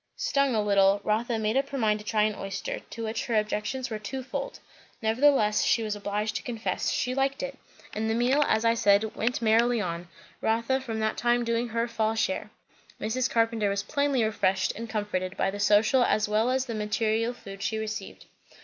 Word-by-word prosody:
Stung 280 - +1
a 215 - +2
little, 200 -1 +4
Rotha 225 +2 0
made 215 +1 0
up 275 +1 +1
her 280 - -4
mind 215 -3 +2
to - - -10
try 215 -1 +2
an 215 0 +1
oyster, 195 -1 -5
to 230 - -9
which 220 0 -3
her 235 - 0
objections 215 +4 -2
were 215 - -3
twofold. 265 +5 -5 0.4
Nevertheless, 225 -1 +3
she 235 -4 +2
was 215 -1 -2
obliged 210 +1 -2
to - - -6
confess, 230 -2 -2
she 250 - -1
liked 270 +1 0
it; - - -6 0.3
and 220 +1 -2
the 225 - +1
meal, 255 +5 +3
as 220 +1 +1
I 230 - +5
said, 210 -1 +2
went 235 +2 -1
merrily 230 +2 +3
on; 175 -3 -4 0.3
Rotha 230 +4 +1
from 225 -4 -4
that 220 0 0
time 240 +1 +2
doing 230 +1 0
her 230 +1 -1
fall 220 -1 0
share. 210 -2 -1 0.5
Mrs. 245 +4 -1
Carpenter 225 -2 +1
was 200 0 -1
plainly 280 -3 +1
refreshed 195 -3 +1
and 230 +1 -6
comforted, 200 -4 -3
by 195 - +1
the 205 - -6
social 215 +5 +4
as 215 -3 +2
well 215 +3 +2
as 260 0 +1
the 235 - -5
material 220 +2 0
food 195 -5 -10
she 220 - -1
received. 220 0 -6
220 Hz, 200 wpm, -27 LUFS, 210-240 Hz, 0.5 s, I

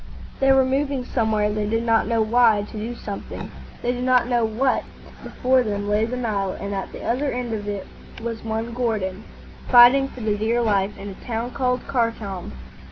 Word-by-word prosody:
They 270 0 +4
were 265 -1 +5
moving 270 -1 -1
somewhere, 220 -4 +1
they 210 -1 -1
did 225 +1 0
not 225 -2 +2
know 230 -1 +2
why, 225 -2 +4
to - - -10
do 225 +3 -4
something, 205 -3 -7 0.3
they 245 - +1
did 245 0 -3
not 250 -1 +3
know 240 -2 +2
what. 230 +4 +1 0.4
Before 260 0 +1
them 205 -3 -2
lay 210 +1 +2
the 250 +2 -4
Nile, 205 -6 -1
and 200 0 -4
at 195 -1 -4
the - - -9
other 270 +4 0
end 245 -2 -3
of 205 -1 -4
it 200 -2 -4 0.3
was 230 -1 -5
one 225 +1 -3
Gordon, 215 -5 -2 0.4
fighting 250 +2 +7
for 255 - -11
the 215 -1 0
dear 220 +3 0
life, 205 -2 +1
in 200 +1 -7
a 195 - -11
town 235 +1 -2
called 250 -2 -1
Khartoum. 230 -7 -2
230 Hz, 195 wpm, -23 LUFS, 210-250 Hz, 0.4 s, fighting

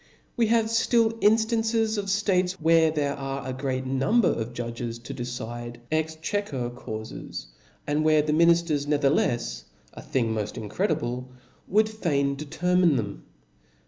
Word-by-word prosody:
Wc 230 -2 +2
have 225 0 +3
ftill 230 0 +3
inftances 225 0 +2
of 205 -1 -2
ftates 190 -2 +1
where 165 -2 +4
there 145 -2 -1
are 135 -1 -5
a 130 - -3
great 130 0 -2
number 135 - +2
of 115 +1 -2
judges 115 -1 -5
to 115 - -8
decide 120 -1 -6
exchequer 155 -3 -2
caufes, 110 - -7 0.4
and 150 +1 0
where 155 -1 +4
the 150 0 0
minifters 170 -3 +3
never 145 -2 +2
thelefs - - 0 0.3
(a - - -9
thing 115 -4 0
moft 105 -1 -3
incredible!) 125 - -2 0.4
would 215 +2 +3
fain 145 -10 0
determine 170 +3 +2
them. 100 - -4
150 Hz, 140 wpm, -26 LUFS, 120-190 Hz, 0.4 s, where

